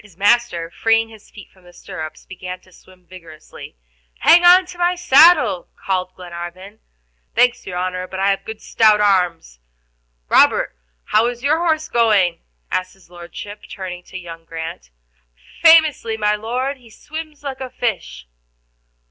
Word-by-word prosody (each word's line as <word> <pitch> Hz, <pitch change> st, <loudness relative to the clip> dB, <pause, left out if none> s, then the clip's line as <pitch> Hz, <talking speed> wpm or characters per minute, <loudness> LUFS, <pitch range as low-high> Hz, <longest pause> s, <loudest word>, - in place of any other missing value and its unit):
His 195 Hz, -5 st, -19 dB
master, 200 Hz, -5 st, +1 dB
freeing 225 Hz, +3 st, +1 dB
his 220 Hz, -2 st, -16 dB
feet 200 Hz, -, -14 dB
from 185 Hz, -, -25 dB
the 175 Hz, 0 st, -17 dB
stirrups, 160 Hz, -5 st, -9 dB
began 185 Hz, -1 st, -8 dB
to 185 Hz, -, -23 dB
swim 185 Hz, 0 st, -21 dB
vigorously. 165 Hz, -, -13 dB, 0.5 s
"Hang 350 Hz, +1 st, +6 dB
on 360 Hz, +1 st, +7 dB
to 355 Hz, -1 st, -12 dB
my 350 Hz, +1 st, +2 dB
saddle," 325 Hz, -, +4 dB
called 185 Hz, -1 st, -3 dB
Glenarvan. 180 Hz, +3 st, -9 dB, 0.6 s
"Thanks, 245 Hz, 0 st, +2 dB
your 180 Hz, -1 st, -5 dB
honor, 185 Hz, 0 st, -3 dB
but 190 Hz, -, -7 dB
I 195 Hz, +1 st, +2 dB
have 195 Hz, -, -3 dB
good 220 Hz, -1 st, -9 dB
stout 215 Hz, -2 st, +3 dB
arms." 180 Hz, -, 0 dB, 0.7 s
"Robert, -, -, +3 dB, 0.3 s
how 220 Hz, +2 st, +2 dB
is 245 Hz, 0 st, -5 dB
your 305 Hz, +3 st, +2 dB
horse 315 Hz, -2 st, 0 dB
going?" 205 Hz, -7 st, +2 dB, 0.3 s
asked 185 Hz, +1 st, -3 dB
his 190 Hz, -2 st, -24 dB
Lordship, 180 Hz, +4 st, -10 dB
turning 185 Hz, -2 st, -7 dB
to 185 Hz, -, -9 dB
young 165 Hz, -2 st, -10 dB
Grant. 160 Hz, -, -8 dB, 0.7 s
"Famously, 315 Hz, -9 st, +5 dB
my 210 Hz, -1 st, +1 dB
Lord, 250 Hz, +6 st, -3 dB
he 245 Hz, -3 st, -19 dB
swims 310 Hz, +5 st, -9 dB
like 270 Hz, -2 st, -6 dB
a 260 Hz, -, -5 dB
fish." 185 Hz, -, -4 dB
205 Hz, 155 wpm, -19 LUFS, 180-245 Hz, 0.7 s, on